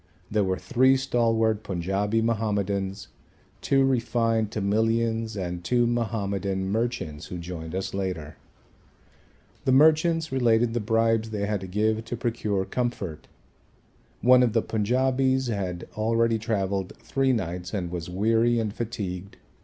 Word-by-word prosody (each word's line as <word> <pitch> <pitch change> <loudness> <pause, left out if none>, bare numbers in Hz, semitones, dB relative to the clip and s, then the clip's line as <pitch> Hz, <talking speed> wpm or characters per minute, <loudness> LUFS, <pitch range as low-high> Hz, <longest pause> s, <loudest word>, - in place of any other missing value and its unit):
There 105 -1 +2
were 95 -1 0
three 130 +3 +3
stalwart 115 -4 +1
Punjabi 100 +4 -1
Mahomedans, 100 -3 -1 0.5
two 135 -1 +3
refined 115 -4 +1
Tamilians 110 +2 0
and 90 -2 -4
two 120 +5 +2
Mahomedan 100 -5 -1
merchants 110 -10 -2
who 90 - -6
joined 85 -1 -6
us 95 - -3
later. 90 -6 -4 1.3
The 130 - +3
merchants 160 +3 +4
related 120 -3 +2
the 120 - 0
bribes 115 0 +1
they 105 -2 -2
had 105 -2 -1
to 95 - -6
give 110 +4 0
to 120 +1 -4
procure 110 -5 -1
comfort. 110 -11 -3 0.9
One 125 +2 +6
of 120 -3 +2
the 115 - +2
Punjabis 130 +4 +1
had 95 -5 -3
already 115 +1 +1
travelled 100 -4 -2
three 135 -1 0
nights 90 -6 -3
and 90 -5 -3
was 85 -1 -5
weary 115 +5 +2
and 110 -3 -1
fatigued. 100 -5 -5
110 Hz, 130 wpm, -26 LUFS, 95-120 Hz, 1.3 s, One